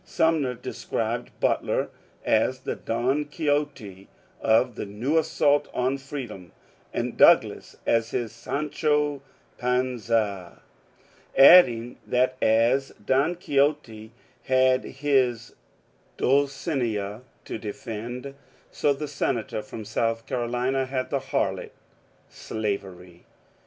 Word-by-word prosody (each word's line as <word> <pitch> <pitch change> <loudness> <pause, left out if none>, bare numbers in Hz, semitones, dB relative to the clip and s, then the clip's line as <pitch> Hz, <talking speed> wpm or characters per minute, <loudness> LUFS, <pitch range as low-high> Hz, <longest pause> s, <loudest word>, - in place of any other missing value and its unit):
Sum 160 -1 +1
ner 125 -2 -2
described - - -3
Butler - - 0 0.3
as 125 +4 +2
the - - -3
Don 130 +6 -1
Quixote 145 - -2 0.3
of' 115 +3 +3
the 105 - -6
new 125 +11 0
assault 145 -2 +2
on 130 +2 0
freedom, 125 - -8 0.4
and - - -3
Douglas - - +4
as 115 0 +2
his 115 -3 -3
Sancho 150 +3 -1 0.4
Panza, 115 -7 -1 0.7
adding 125 -6 +7
that 130 +1 +2
as 120 +5 +2
Don 140 +8 +2
Quixote 140 -9 -1 0.3
had 130 -1 +3
his 135 -4 0 0.6
Dulcinea 130 - 0 0.2
to - - -5
defend, 115 +5 -6 0.4
so 145 - +1
the 150 +2 -5
senator 115 -6 -2
from 115 -4 -9
South 115 +1 -1
Carolina 125 +2 -1
had 130 -1 -3
the 140 - +1
harlot 135 - -2 0.4
— - - -36
slavery. 95 -5 -5
125 Hz, 105 wpm, -25 LUFS, 110-140 Hz, 0.7 s, adding